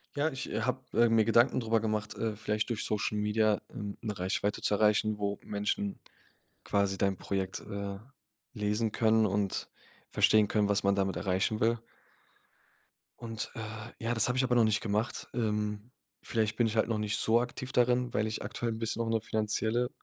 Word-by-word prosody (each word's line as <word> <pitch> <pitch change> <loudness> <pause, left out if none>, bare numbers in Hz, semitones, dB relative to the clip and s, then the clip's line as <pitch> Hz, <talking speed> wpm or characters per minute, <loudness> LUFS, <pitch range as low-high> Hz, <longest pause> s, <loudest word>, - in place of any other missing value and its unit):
Ja, 145 +2 +1
ich, 130 - -5
äh, - - -1
habe, - - -1 0.2
äh, 120 - +7
mir 115 -1 +4
Gedanken 115 +4 +4
drüber 115 -1 +1
gemacht, 110 -1 -2
äh, 110 -2 -2
vielleicht 105 +1 -1
durch 115 - -2
Social 105 0 -1
Media, 105 0 +2
ähm, 100 -1 -6
'ne 105 -3 -4
Reichweite 95 +3 -1
zu - - +1
erreichen, 105 0 +2
wo 100 -1 -1
Menschen 100 -1 -2 0.6
quasi 100 -1 +1
dein 100 -1 +1
Projekt, 95 -1 -3
äh, 100 -1 -5 0.6
lesen 105 0 0
können 110 0 +3
und 100 0 -1 0.4
verstehen 110 -1 +4
können, 105 0 +2
was 100 0 +2
man 100 0 +3
damit 95 -1 0
erreichen 95 +3 0
will. 115 +1 +2 1.4
Und, 115 -2 -5
äh, - - -6 0.4
ja, 115 +1 +1
das 115 +1 +3
habe 125 - 0
ich 130 - +3
aber 125 -1 +1
noch 120 - +5
nicht 110 -1 +3
gemacht. 110 +2 -2
Ähm, 105 -1 -2 0.3
wielleicht 110 -1 0
bin 120 0 +2
ich 110 0 -3
halt 110 - +3
noch 115 - 0
nicht 105 0 0
so 115 +2 +3
aktiv 130 +1 -5
darin, 125 0 +2
weil 110 +1 +1
ich 110 - -4
aktuell 120 -1 -3
'n 110 - -5
bisschen 115 0 -1
auch 115 - -1
'ne 115 0 +2
finanzielle 110 +3 0
110 Hz, 190 wpm, -31 LUFS, 105-115 Hz, 1.4 s, äh